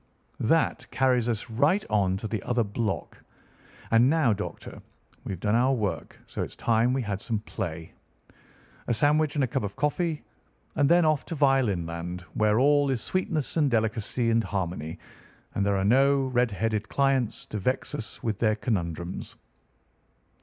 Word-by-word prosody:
That - - +1
carries 125 -3 +2
us 115 -3 -2
right 145 - +2
on 95 -3 +1
to 110 - -5
the 110 -2 -3
other 120 +1 0
block. 105 0 -3 0.7
And 115 +3 +5
now, 150 -7 +3
Doctor, 105 +1 -7 0.4
we've 95 - -4
done 105 +3 0
our 125 +3 +3
work, 95 -9 -3
so - - -5
it's - - -5
time 115 +1 +2
we 130 0 0
had 100 -2 -3
some 115 -2 -2
play. 85 -6 -6 0.9
A 120 - +1
sandwich 150 +5 +2
and 145 - +2
a - - +2
cup - - -1
of 100 -1 -5
coffee, 155 +1 -1 0.5
and 145 -1 +3
then 170 0 +5
off 155 -2 +2
to 165 - -4
violin 135 - +2
land, 85 +2 -5
where 110 +1 +2
all 145 +1 +4
is 130 -3 0
sweetness 165 -6 -1
and 150 -3 +3
delicacy 115 0 0
and 115 0 +3
harmony, 85 -6 -3 0.6
and 100 - 0
there 100 0 +1
are 95 - 0
no 135 +5 +4
red 125 -1 +2
headed 110 +1 -2
clients 135 -4 +1
to 105 - -5
vex 130 +7 -1
us 110 -3 -7
with 110 -4 -2
their 110 -2 +2
conundrums." 90 -6 -3
115 Hz, 165 wpm, -27 LUFS, 100-135 Hz, 0.9 s, And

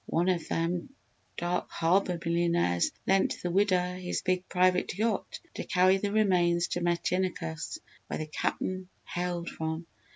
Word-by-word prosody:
One 175 +3 +2
of 175 -3 0
them 170 +4 -1 0.5
Dark 175 +1 -1
Harbour 180 +2 +2
millionaires 170 - +2
lent 195 0 +3
the 175 - -1
widder 180 -2 +2
his 180 -1 -3
big 185 0 0
private 180 0 +2
yacht 220 -1 -1
to - - -4
carry 185 +1 +4
the 200 +1 -2
remains 175 -5 +3
to 175 - -2
Metinicus, 175 - -1 0.3
where - - -3
the 155 - -3
Cap'n 185 +4 -2 0.2
hailed 175 -1 -3
from. 160 +1 -3
180 Hz, 140 wpm, -29 LUFS, 170-185 Hz, 0.5 s, carry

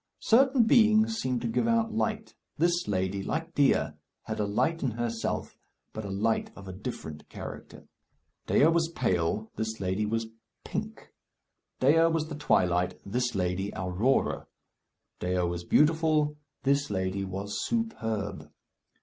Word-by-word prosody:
Certain 260 +1 +5
beings 220 -1 +4
seem 125 - 0
to 120 - -1
give 115 - 0
out 230 -1 +2
light. 220 0 -2 0.2
This 175 +2 +1
lady, 95 -1 -1
like 165 +10 -3
Dea, 140 -2 +3 0.3
had - - -5
a 105 - +1
light 160 +11 0
in 135 - +1
herself, 115 0 -3 0.4
but 110 - -5
a 100 - -5
light 110 +4 0
of 100 -1 -11
a 95 - -6
different 75 -4 -7
character. - - -9 0.6
Dea - - +4
was 165 0 +3
pale, 105 -1 0
this 110 0 -3
lady 95 +2 -1
was 115 +1 -1 0.4
pink. - - -6 0.7
Dea 160 +5 +5
was 160 -1 0
the 155 - -5
twilight, 90 -10 +1
this 120 +3 -1
lady, 95 +2 -1
Aurora. 95 +9 0 0.7
Dea 90 0 0
was 85 0 -2
beautiful, 155 - +3 0.3
this 140 +1 +2
lady 95 0 -1
was 95 +2 -4
superb. 110 - -2
115 Hz, 140 wpm, -28 LUFS, 95-165 Hz, 0.7 s, Certain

